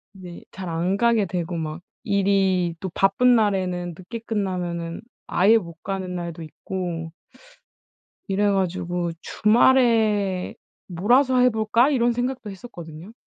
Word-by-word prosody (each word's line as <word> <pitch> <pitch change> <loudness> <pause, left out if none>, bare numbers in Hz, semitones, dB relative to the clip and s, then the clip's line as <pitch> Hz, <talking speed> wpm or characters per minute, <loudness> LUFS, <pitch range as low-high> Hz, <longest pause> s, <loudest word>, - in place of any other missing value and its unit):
이제 180 -2 -10
잘 185 -2 -7
안 175 +4 -1
가게 235 -2 +3
되고 175 -1 -3
막 160 0 -4 0.2
일이 195 -4 +1
또 190 - -4
바쁜 245 +6 +4
날에는 185 -5 0
늦게 210 +6 -7
끝나면은 175 -6 -3 0.3
아예 210 +5 +4
못 170 -5 -7
가는 190 -2 -4
날도 170 -2 -5
있고 165 0 -5 1.2
이래 205 +1 +1
가지고 180 -2 -1
'주말에 215 -5 +2 0.3
몰아서 245 +9 +2
해 250 0 +5
볼까?' 220 +3 +2
이런 240 -4 +2
생각도 245 -1 -3
했었거든요. 175 -4 -10
190 Hz, 255 characters per minute, -23 LUFS, 175-220 Hz, 1.2 s, 해